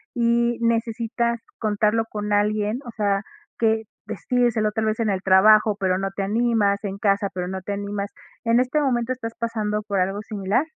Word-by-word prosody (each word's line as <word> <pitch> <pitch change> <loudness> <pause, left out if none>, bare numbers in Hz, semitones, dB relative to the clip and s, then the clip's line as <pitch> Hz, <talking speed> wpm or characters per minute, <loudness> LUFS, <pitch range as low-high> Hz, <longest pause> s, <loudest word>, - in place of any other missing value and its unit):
y 235 0 +2
necesitas 230 0 0 0.2
contarlo 215 +1 +1
con 210 0 -3
alguien, 210 +3 +1
o 240 - -7
sea, 200 -1 +1 0.4
que 220 -1 +2 0.2
decírselo 220 +1 0
tal 220 0 -1
vez 215 +1 -1
en 220 -2 +1
el 190 -1 -1
trabajo, 210 +2 +5
pero 185 -1 +1
no 195 0 -2
te 200 - -2
animas, 215 -1 +2
en 195 -1 -4
casa, 200 -1 +1
pero 180 -1 -3
no 190 0 -4
te 200 +2 -4
animas. 200 0 -4 0.3
¿En 230 +1 +3
este 255 +4 +1
momento 245 -3 0
estás 230 -3 -6
pasando 215 -2 -1
por 200 -3 -1
algo 195 +3 0
similar? 210 +7 -1
215 Hz, 180 wpm, -23 LUFS, 200-230 Hz, 0.4 s, trabajo